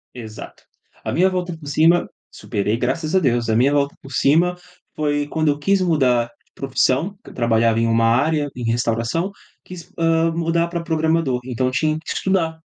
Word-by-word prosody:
Exato. 110 -3 -10 0.4
A - - -2
minha 185 +3 +3
volta 180 -2 -3
por 155 - -13
cima 165 +4 +3 0.2
superei 105 -1 -2
graças 140 +8 -2
a 190 - +6
Deus, 120 -7 +1
a 110 - +2
minha 135 +4 +3
volta 140 -1 +1
por 135 0 -11
cima 170 +7 +3 0.4
foi 145 -1 -1
quando 155 0 0
eu 145 0 +1
quis 195 +5 +2
mudar 130 -9 +2 0.2
de - - -39
profissão, 135 +7 0
que - - -12
eu - - -13
trabalhava 115 -1 +2
em 115 - +2
uma 115 0 +2
área, 145 +5 +2
em 125 - -5
restauração, 120 - -1 0.3
quis, 180 -2 -11
hã, 165 0 +2
mudar 170 0 0
para 170 -1 -4
programador, 160 -5 0
então 130 0 -2
eu 130 - -1
tinha 155 +2 0
que 160 - -6
estudar. 165 -4 0
150 Hz, 190 wpm, -20 LUFS, 125-165 Hz, 0.4 s, a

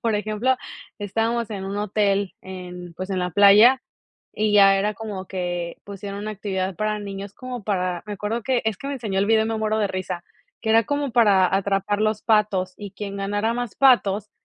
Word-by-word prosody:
por 230 -2 +1
ejemplo, 215 +5 0 0.4
estábamos 225 +3 -1
en 195 -3 -5
un 195 +1 -4
hotel 200 -1 0
en, 180 -2 -8
pues, 185 +1 -5
en 190 - -1
la 180 0 -1
playa, 210 +8 +7 0.5
y 215 0 0
ya 195 -1 +7
era 210 +2 0
como 205 -3 -6
que 175 -2 -4
pusieron 200 0 -7
una 215 - -4
actividad 190 -2 -3
para 215 +1 -1
niños, 200 -1 -7
como 250 -1 -7
para, 180 -4 -1
me 210 - -5
acuerdo 210 +4 -3
que 255 0 +1
es 220 -3 0
que 275 - -7
me 280 - -2
enseñó 215 -7 -2
el 195 - +2
video 220 +1 +4
y - - -2
me 225 0 -2
muero 215 0 0
de 210 -2 +1
risa, 185 -2 -4 0.4
que 220 - -3
era 225 +1 +5
como 285 +1 -2
para 200 -6 +4
atrapar 195 +1 0
los 215 -1 0
patos 205 -4 +1
y 205 -2 -8
quien 200 0 -6
ganara 205 +3 -1
más 240 -3 -4
patos, 215 -6 +3
205 Hz, 205 wpm, -23 LUFS, 195-220 Hz, 0.5 s, playa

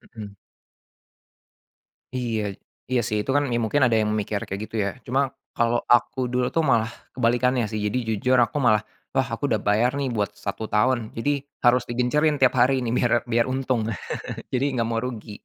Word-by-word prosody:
Mhm. 105 -2 -8 1.8
Iya. 110 -5 -2 0.4
Iya, 125 -2 +3
sih. 105 - -1
Itu 135 - -2
kan 145 - +4
me - - +1
mungkin 135 +6 +2
ada 120 -3 +4
yang 105 0 +1
mikir 105 -1 -1
kayak 100 +1 -5
gitu, 110 - -8
ya. - - 0 0.2
Cuma 130 +3 +1 0.3
kalau 120 0 +2
aku 120 +2 +3
dulu 125 0 +1
tuh 165 - +3
malah 115 -6 +3 0.2
kebalikannya, 125 0 +2
sih. 110 - -2
Jadi 105 +3 0 0.2
jujur 125 +5 +2
aku 120 +4 +2
malah, 110 -3 +5 0.3
wah, 130 -1 +1
aku 145 - -14
udah 110 - +2
bayar 110 +5 +3
nih 135 - 0
buat 105 -1 0
1 100 +2 -3
tahun. 115 +1 +1
Jadi 145 +5 +1 0.3
harus 120 0 +5
digencerin 145 +5 +1
tiap 130 -1 +4
hari 130 +2 +4
nih 115 - -2
biar 120 - +2 0.2
biar 115 0 +2
untung. 130 -3 0 0.7
Jadi 130 +1 0
nggak 115 -2 0
mau 115 - 0
rugi. 115 -4 -6
120 Hz, 185 wpm, -24 LUFS, 110-130 Hz, 1.8 s, malah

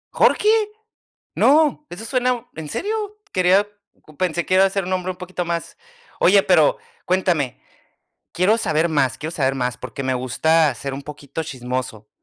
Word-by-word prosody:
¡¿Jorge?!, 420 - +3 0.9
¡no!, 300 +1 +3
eso 180 +5 -8
suena 250 0 0
¿en 160 -1 -6
serio? 425 - -3
Quería 190 +2 +3 0.5
pensé, 175 -2 0
que 185 - 0
iba 190 +1 +6
a 195 - +2
ser 195 0 -1
un 185 - -5
nombre 185 0 -1
un - - -17
poquito 180 -1 -4
más 170 -1 -4 0.4
Oye, 195 +2 +6
pero 160 -5 +4 0.3
cuéntame, 175 -8 0 0.7
quiero 185 +5 +3
saber 160 -5 +1
más, 135 -4 +1
quiero 155 - -5
saber 135 -6 0
más, 125 -3 -2
porque 130 +2 -6
me 130 -1 0
gusta 150 +4 +2
ser 135 +3 -5
un 140 - -7
poquito 145 +1 -7
chismoso. 125 -6 -5
170 Hz, 160 wpm, -21 LUFS, 140-195 Hz, 0.9 s, iba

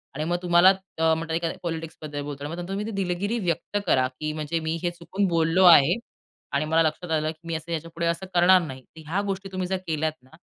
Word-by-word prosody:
आणि 155 - -2
मग 175 +2 0
तुम्हाला 175 +1 +6
अ, 190 -4 +1
म्हणतात 160 0 -2
एखाद्या 165 -1 -2
पॉलिटिक्सबद्दल 160 -3 -5
बोलतो 145 -1 -7
आणि 150 - -4
मग - - -6
नंतर 175 - -6
तुम्ही 205 +2 -2
ती 225 - -4
दिलगिरी 195 +3 -1
व्यक्त 175 +2 -2
करा 130 -1 +3
की 155 0 -2
म्हणजे, 155 +2 -2
"मी 160 0 -2
हे 175 - +1
चुकून 175 +3 -2
बोललो 165 +2 +2
आहे 165 0 +8 0.6
आणि 155 - 0
मला 160 +1 +3
लक्षात 160 +2 -2
आलं, 155 0 +1
की 160 +1 -15
मी 165 - -3
याच्यापुढे 165 +1 -4
असं 170 +3 -1
करणार 180 +1 +6
नाही." 130 -5 -7
तर 160 - -15
ह्या 195 +4 +1
गोष्टी 195 0 -4
तुम्ही 185 -1 -2
जर 190 0 -1
केल्या 155 0 0
ना, 130 - -22
165 Hz, 230 wpm, -25 LUFS, 160-180 Hz, 0.6 s, आहे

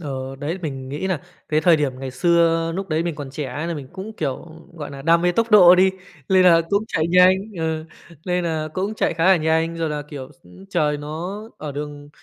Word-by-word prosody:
Ờ, 135 -3 -5
đấy. 155 +6 -3
Mình 135 -4 -5
nghĩ 145 +7 -4
là 185 -7 -1 0.3
cái 155 0 +2
thời 170 -1 +5
điểm 145 -3 0
ngày 135 -1 -5
xưa, 165 +2 +2
núc 195 0 -4
đấy 155 0 0
mình 170 -1 -3
còn 145 -2 -7
trẻ 140 -1 -5
nên 165 +3 -3
là 170 - -2
mình 140 -4 -8
cũng, 190 +3 -7
kiểu, 155 -4 -4 0.3
gọi 150 -3 -6
nà, 140 -1 -9
đam 165 +3 +3
mê 175 0 +2
tốc 230 +5 0
độ 180 -5 +8
đi, 185 +1 +4 0.4
lên 185 -1 +5
là 170 -2 +6
cũng 200 +2 +2
chạy 160 -7 0
nhanh 180 +1 +6 0.2
ờ, 160 -1 -2 0.4
lên 180 -1 -1
là 160 -2 -2
cũng 195 +3 -2
chạy 215 - 0
khá 165 0 0
là 190 0 +6
nhanh 160 +1 0
rồi 165 -1 -1
là, 150 -1 -3
kiểu, 140 -3 -9
s 130 - -26 0.2
trời 150 -1 +1
nó 160 +7 -6 0.2
ở 150 -2 -6
đường 145 0 -7
160 Hz, 235 wpm, -21 LUFS, 145-180 Hz, 0.4 s, độ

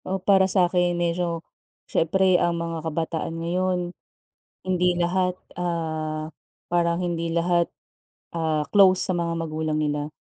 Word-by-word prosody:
Oh, 190 - -1
para 190 0 +3
sa'kin 180 -1 +2
medyo, 170 -1 -1 0.4
siyempre 185 +3 +2
ang 170 0 +1
mga 165 -1 -3
kabataan 165 +1 -3
ngayon 180 +1 -1 0.7
hindi 180 -1 +1
lahat, 180 +1 +1 0.2
ah, 160 -2 -3 0.4
parang 170 0 +1
hindi 170 -1 -2
lahat, 170 +1 +1 0.7
ah, 155 -2 0
close 190 -2 +6
sa 185 - 0
mga 170 -1 -1
magulang 155 -1 -2
nila. 150 0 -2
170 Hz, 125 wpm, -24 LUFS, 165-180 Hz, 0.7 s, close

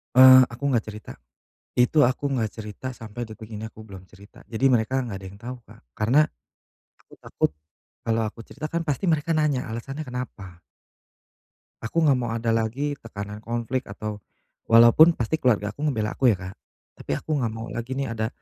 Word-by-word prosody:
Eee, 130 0 +10
aku 120 +3 -11
gak 115 - +2
cerita, 105 0 -9 0.7
itu 125 +5 +3
aku 130 +3 +1
gak 110 -3 -1
cerita 110 +4 -7
sampai 115 +2 -6
detik 110 -1 -9
ini 110 -1 -7
aku - - -17
belum 95 -2 -10
cerita, 100 +2 -16
jadi 115 +4 0
mereka 130 +1 +2
gak 100 - -5
ada 95 - -8
yang 100 +1 -14
tau 125 +2 -6
Kak, - - -17 0.2
karena 120 +7 +3 0.8
aku - - -22
takut - - 0 0.5
kalau 115 0 +1
aku 115 - -10
cerita 155 +6 -7
kan 170 +1 -2
pasti 150 +4 -2
mereka 160 0 +1
nanya 150 -4 +1
alasannya 135 +6 -5
kenapa. 120 -9 -7 1.2
Aku 160 +9 0
nggak 135 -4 +4
mau 120 - -2
ada 115 0 0
lagi 115 +6 0
tekanan 105 -1 -7
konflik 120 +3 -3
atau 105 +1 -6 0.5
walaupun 120 +9 +7
pasti 125 +7 -1
keluarga 105 -4 +2
aku 140 - -14
ngebela 110 -6 -1
aku 130 - +2
ya 110 - +4
Kak, 95 +1 -8 0.5
tapi - - -9
aku 155 - -9
nggak 115 -3 -1
mau 115 +1 -6
lagi 120 +3 -4
nih 135 -4 -2
ada, 110 0 -1
115 Hz, 180 wpm, -25 LUFS, 110-130 Hz, 1.2 s, Eee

